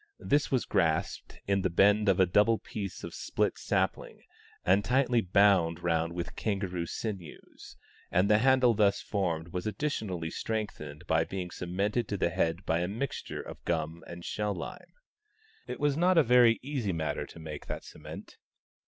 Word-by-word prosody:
This 145 0 +1
was 130 -3 +1
grasped 80 -3 -1
in 100 0 +1
the 95 - +1
bend 100 +4 +4
of 95 - +3
a 95 - +6
doubled 105 +5 +3
piece 100 -3 -6
of - - -6
split - - -1
sapling, - - -1 0.4
and 95 +3 +4
tightly 125 0 +2
bound 90 -4 +3
round 85 -1 0
with 85 +1 -5
kangaroo 95 -5 -2
sinews; 95 -8 -7 0.3
and 90 +3 +2
the 105 0 +5
handle 130 -1 +4
thus 100 -2 +3
formed 85 -5 -2
was 90 +3 -4
additionally 105 - -3
strengthened 85 -11 -4
by 80 0 +2
being 90 0 -5
cemented 100 +7 -1
to 100 - -2
the 85 - +1
head 85 +2 -1
by 80 +1 +1
a 90 - -1
mixture 115 +8 -4
of - - -10
gum 80 0 -2
and 85 0 -9
shell 105 -1 -2
lime. 85 - -8 0.8
It - - -5
was 145 -1 +2
not 180 +3 +3
a 165 - +7
very 120 -2 +5
easy 130 -7 -2
matter 80 -1 -2
to - - -13
make 75 -2 -8
that - - -5
cement. - - -11
100 Hz, 170 wpm, -30 LUFS, 85-110 Hz, 0.8 s, a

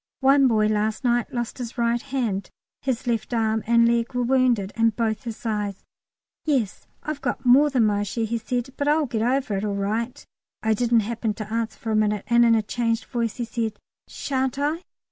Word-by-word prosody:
One 270 0 +5
boy 215 -3 +3
last 215 +2 0
night 240 -1 +2
had - - -12
lost 240 +1 -3
his 240 -1 -6
right 235 0 +1
hand; 240 -9 -2 0.3
his 260 -2 -2
left 235 0 -1
arm 220 -1 +1
and 235 0 +5
leg 235 +1 0
were 245 - +1
wounded, 240 -6 +2
and 225 -1 +2
both 225 +2 -1
his 230 0 -7
eyes. 210 -3 -2 0.6
"Yes, 260 -10 -1 0.2
I've 305 -2 -4
got - - -3
more 270 +4 +6
than 255 -5 +3
my 205 -1 +1
share," 205 +3 -2
he 230 +1 -2
said, 245 +3 -3
"but 285 - -1
I'll 300 +1 +3
get 230 -4 -2
over 250 -3 +1
it 195 - -3
all 205 -1 -1
right." 230 +7 -2 0.4
I 220 0 +3
didn't 235 +1 +3
happen 225 0 -2
to 215 0 -6
answer 230 -1 -2
for 225 - -4
a - - +2
minute, 210 -1 +1
and 235 0 +4
in 230 -1 +5
a 220 - +1
changed 230 +1 -1
voice 230 -3 -2
he 240 - -3
said, 225 -2 -3 0.3
"Shan't 265 -1 -2
I? 300 +4 0
235 Hz, 210 wpm, -24 LUFS, 220-250 Hz, 0.6 s, more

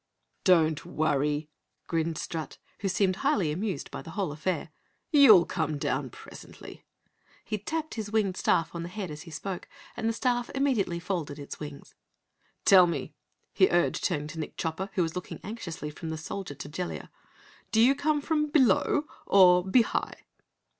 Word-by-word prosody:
"Don't 160 -4 +4
worry," 150 0 0 0.4
grinned 165 -1 -1
Strut, 160 -2 -5 0.2
who 200 - -1
seemed 185 0 +1
highly 210 - +1
amused 185 -2 -3
by - - -6
the - - -11
whole 175 -1 -2
affair, 160 +1 -3 0.4
"you'll 240 - +8
come 155 -2 -2
down 130 -1 -1
presently." - - -12 0.6
He 215 - -3
tapped 315 +9 -3
his 215 -3 -4
winged 205 -4 +1
staff 165 -3 +1
on 170 - -4
the 170 - -5
head 185 -2 -5
as 150 0 -8
he 170 - -11
spoke, 185 +3 -5 0.3
and 225 -1 -1
the - - 0
staff 245 0 0
immediately 240 -11 +1
folded 170 -5 -3
its 145 -1 -8
wings. 145 -2 -9 0.7
"Tell 185 -2 +8
me," 170 - -3 0.4
he 380 - +4
urged, 175 - +1
turning 150 -5 0
to 160 - -7
Nick 155 - -6
Chopper 165 +5 -3
who 180 - +2
was 165 -1 -3
looking 180 - -6
anxiously 170 -8 -6
from 160 +2 -7
the 160 - -3
Soldier 160 0 -6
to 145 - -8
Jellia. 175 +4 -5 0.6
"Do 220 - +2
you 245 +4 +6
come 295 +1 0
from 300 0 0
below 285 0 +3 0.2
or 180 -2 +6
be 210 +6 +4
high?" - - -3
180 Hz, 170 wpm, -28 LUFS, 160-220 Hz, 0.7 s, you'll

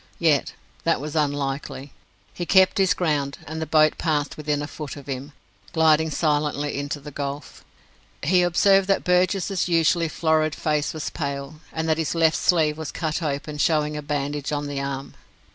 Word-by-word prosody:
Yet 155 -5 +2 0.3
that 165 - +2
was 150 +2 -6
unlikely. 140 -2 -2 0.4
He 175 - -5
kept 190 0 +5
his 190 -1 +3
ground, 145 -5 -1
and 160 +1 -5
the 160 - -3
boat 155 0 +3
passed 150 -3 0
within 150 -1 -2
a - - -4
foot 150 -1 -7
of 140 - -10
him, 135 +1 -5 0.4
gliding 160 -1 +4
silently 150 -1 0
into 145 +1 -3
the 145 +1 -10
gulf. 140 +1 -6 0.6
He 180 +5 +4
observed 190 +2 +4
that 195 - +2
Burgess's 180 +1 +1
usually 165 0 +3
florid 155 -1 +1
face 150 -1 0
was 155 -2 -5
pale, 140 0 -4
and 160 0 -3
that 160 0 +1
his 160 +1 -1
left 160 -1 +3
sleeve 155 -3 +2
was 160 - -4
cut 160 0 -2
open, 150 0 -3
showing 150 -1 +2
a 150 - -3
bandage 145 0 -3
on 145 0 -2
the 140 -1 -3
arm. 140 0 -5
155 Hz, 175 wpm, -24 LUFS, 145-165 Hz, 0.6 s, kept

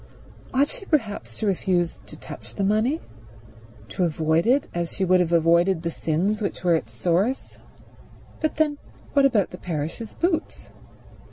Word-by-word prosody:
Ought 275 +2 +3
she 395 - -9
perhaps 205 - -1
to - - -2
refuse 180 -3 0
to - - -11
touch - - -10
the 200 - -1
money, 215 +10 +2 0.9
to 185 - -1
avoid 160 +2 +1
it 265 +4 +3
as 170 -1 -2
she 190 - 0
would 185 0 +4
have 175 -2 +1
avoided 170 +1 +3
the 170 - -1
sins 185 +8 0
which 200 - -3
were 175 -1 +4
its 160 - -1
source? 190 +10 -1 0.8
But 310 - -1
then 300 -2 +1 0.3
what 280 -1 +5
about 225 -8 +2
the 180 - -9
parish's 170 +6 -4
boots? 340 -2 -2
190 Hz, 160 wpm, -24 LUFS, 170-245 Hz, 0.9 s, what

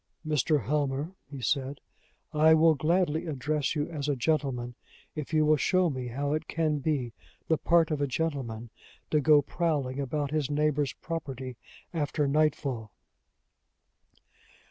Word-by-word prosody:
"Mr. 150 -2 +1
Helmer," 145 - 0 0.2
he 140 -2 -7
said, 135 +3 -1 0.5
"I 155 +1 +6
will 160 0 +6
gladly 160 +2 +1
address 150 0 -1
you 150 -1 0
as 150 -3 -4
a 145 - +2
gentleman, 130 -3 -1 0.4
if 150 -1 -6
you 155 -1 +3
will 155 0 +4
show 185 +3 +2
me 130 -2 -4
how 140 +4 -2
it 155 +1 -2
can 155 -3 0
be 135 -5 -1 0.3
the 160 - +2
part 165 -1 +3
of 150 -2 -1
a 145 - +2
gentleman 125 -6 -3 0.4
to 150 - +4
go 150 0 +6
prowling 145 -5 -1
about 140 +1 -2
his 150 -3 0
neighbor's 150 -2 +1
property 135 -6 -5 0.4
after 150 -2 0
nightfall." 140 -6 0
150 Hz, 145 wpm, -29 LUFS, 135-155 Hz, 0.5 s, I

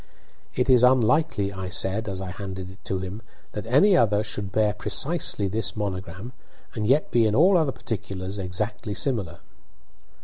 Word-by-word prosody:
"It 125 - +1
is 125 -2 +5
unlikely," 125 -4 +3
I 95 -1 -5
said, 100 +4 0
as 95 -1 -5
I 95 -1 -5
handed 95 -1 -7
it 95 - -17
to 95 - -1
him, 95 +4 -6 0.3
"that 105 +1 -6
any 150 - +5
other 105 - +3
should 105 -2 -4
bear 105 0 +2
precisely 105 - 0
this 110 +3 -1
monogram, 95 +2 -5 0.4
and 105 -2 -2
yet 140 +5 +2
be 115 -2 +4
in 105 - 0
all 185 +7 +5
other 160 -5 +2
particulars 100 -3 -5
exactly 105 +3 -3
similar." 100 - -1
105 Hz, 165 wpm, -25 LUFS, 95-120 Hz, 0.4 s, is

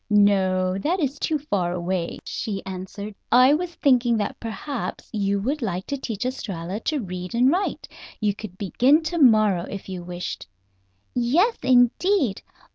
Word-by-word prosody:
"No 190 -2 +3
that 345 - 0
is 285 -2 -1
too 315 - 0
far 200 -12 -1
away," 180 0 -2
she 200 -3 -4
answered. 190 +3 -6 0.2
"I 255 +3 +7
was 345 +2 -2
thinking 245 -4 +3
that 210 - -3
perhaps 235 +3 -5
you 200 -1 0
would 275 +7 -1
like 190 -5 -2
to 280 - -3
teach 225 -2 -4
Estralla 195 -7 -4
to 300 -6 0
read 180 +1 -6
and 250 +3 +4
write. 375 +4 -1 0.3
You 210 -2 +1
could 200 -3 -9
begin 255 - +3
to 330 +2 -2
morrow, 215 - +4
if 195 - -7
you 180 -2 -5
wished." 175 - -6 0.7
"Yes, 305 - +2
indeed! 255 - +3
215 Hz, 155 wpm, -24 LUFS, 190-270 Hz, 0.7 s, I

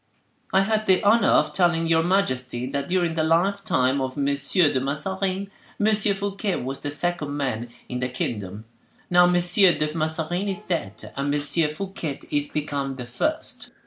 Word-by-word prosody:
"I 190 - +4
had 215 +2 0
the 190 +2 +4
honor 220 +3 +4
of - - +3
telling 175 -3 +2
your 165 0 +3
majesty, 130 -9 0
that 140 +1 -3
during 175 -2 +1
the 160 -1 0
lifetime 165 -6 +1
of 130 +1 -4
M. 140 - 0
de 140 +1 +2
Mazarin, 190 +8 -2 0.3
M. 215 +1 +3
Fouquet 200 -1 +1
was 135 +2 -4
the 145 - -4
second 150 -1 -2
man 120 -4 -2 0.2
in 125 - -4
the 130 0 -1
kingdom; 105 -4 -4 0.5
now 180 0 +7
M. 180 - +2
de 175 -3 +3
Mazarin 165 +4 -1
is 195 +2 -1
dead, 135 - -4
M. 140 +1 -1
Fouquet 155 +1 -2
is 145 0 0
become 140 -2 -3
the 125 -2 -7
first." 120 0 -3
160 Hz, 160 wpm, -24 LUFS, 140-190 Hz, 0.5 s, now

